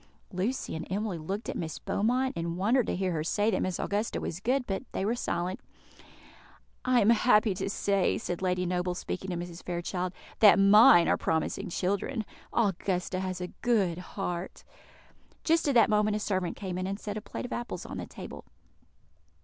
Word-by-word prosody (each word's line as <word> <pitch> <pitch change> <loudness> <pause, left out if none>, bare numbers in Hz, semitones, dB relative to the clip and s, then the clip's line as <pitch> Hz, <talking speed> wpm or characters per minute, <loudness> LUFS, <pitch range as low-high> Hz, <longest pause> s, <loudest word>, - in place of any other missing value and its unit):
Lucy 200 +6 -2
and 160 +2 -6
Emily 200 -3 -2
looked 195 +8 -4
at - - -3
Miss 160 -2 -4
Beaumont, 250 +5 0
and 170 0 -3
wondered 225 +6 +2
to - - -1
hear 185 0 -1
her 155 -2 -1
say 205 +6 +1
that 185 - 0
Miss 185 -2 -1
Augusta 210 +3 -1
was 170 - -4
good, 250 +5 0
but 195 -3 -2
they 190 - -1
were 220 - +1
silent. 180 -5 -2 1.2
"I 255 -1 +3
am 210 - +5
happy 215 -2 +4
to 190 - -3
say," 200 -1 +1
said 175 0 -4
Lady 180 -1 0
Noble, 180 0 -1
speaking 190 +1 -5
to 180 - -2
Mrs. 175 0 -6
Fairchild, 180 +1 -3 0.3
"that 215 -1 +8
mine 195 -3 +7
are - - +3
promising 165 +5 -1
children. 200 +7 -1 0.3
Augusta 190 -4 0
has 185 -1 -3
a 180 - -4
good 195 -8 +2 0.2
heart." 180 -2 -4 0.8
Just 330 -1 +2
at 280 - +2
that 230 - +7
moment 210 0 +3
a - - -1
servant 185 -4 -1
came 185 -3 -4
in, 185 - -2
and 200 +1 -3
set 210 -1 -5
a 215 - -4
plate - - -6
of 245 - -5
apples 240 -7 -5
on - - -6
the - - -5
table. - - -9
195 Hz, 190 wpm, -29 LUFS, 180-215 Hz, 1.2 s, that